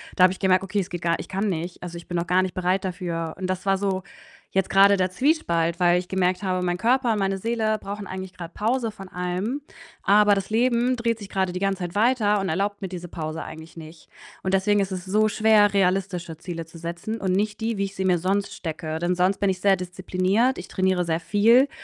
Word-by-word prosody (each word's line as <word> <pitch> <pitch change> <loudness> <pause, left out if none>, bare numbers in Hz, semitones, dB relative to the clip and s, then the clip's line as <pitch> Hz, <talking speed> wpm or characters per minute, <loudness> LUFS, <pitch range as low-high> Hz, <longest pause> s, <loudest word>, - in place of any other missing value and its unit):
da 185 - +4
habe 185 0 +6
ich - - -12
gemerkt: 185 -1 +3
„Okay, 195 +2 -1
es 185 - -3
geht 175 -1 -5
gar 170 0 +1
ich - - -7
kann 195 +2 -1
nicht.“ 175 0 -4
Also, 175 -1 -7
ich 170 - -11
bin 175 - -3
noch 170 0 -2
gar 185 +1 +3
nicht 185 - -3
bereit 185 +2 0
dafür 170 -3 -3
und 185 - -2
das 185 +1 -3
war 195 0 +3
so 190 -1 -1 0.5
jetzt 195 -1 +1
grade 200 +1 +6
der 185 -1 +1
Zwiespalt, 175 - +1
weil 175 -1 +4
ich 180 0 -4
gemerkt 185 0 0
habe, 185 -1 0
mein 175 0 0
Körper, 240 +2 +2
meine 195 -1 0
Seele 220 +1 0
brauchen 200 +1 -6
eigentlich 190 -1 -7
grad 175 -2 -9
Pause 230 +2 0
von 195 -2 -11
allem, 185 +9 -3 0.4
aber 205 +1 +5
das 195 - -3
Leben 240 +2 +2
dreht 230 -1 -1
sich 200 -2 -9
grade 190 -2 -1
die 180 - -3
ganze 195 -1 0
Zeit 175 +1 -5
weiter 215 -2 +3
und 190 - -2
erlaubt 200 +5 -1
mir 190 - -4
diese 175 -1 -7
Pause 160 -1 -5
eigentlich 160 +1 -10
nicht 160 0 -12 0.3
und 190 - -1
deswegen 200 +1 +3
ist 195 - -2
es 185 -1 -5
so 215 +3 +2
schwer, 215 -1 +4
realistische 185 -3 0
Ziele 170 -2 -6
zu 165 - -14
setzen 170 +7 -5
und 190 -1 0
nicht 205 +3 -1
die, 225 -1 -1
wie 200 - 0
ich 195 0 -8
sie 190 - -2
mir 185 -2 +3
sonst 195 +4 -1
stecke. 160 -1 -5
Denn 175 +2 0
sonst 185 +2 +2
bin 200 - +2
ich 185 -1 -2
sehr 195 -1 +4
diszipliniert. 185 +6 0
Ich 180 - -7
trainiere 185 -1 +1
sehr 165 0 -1
viel, 230 - +4
190 Hz, 240 wpm, -24 LUFS, 180-205 Hz, 0.5 s, habe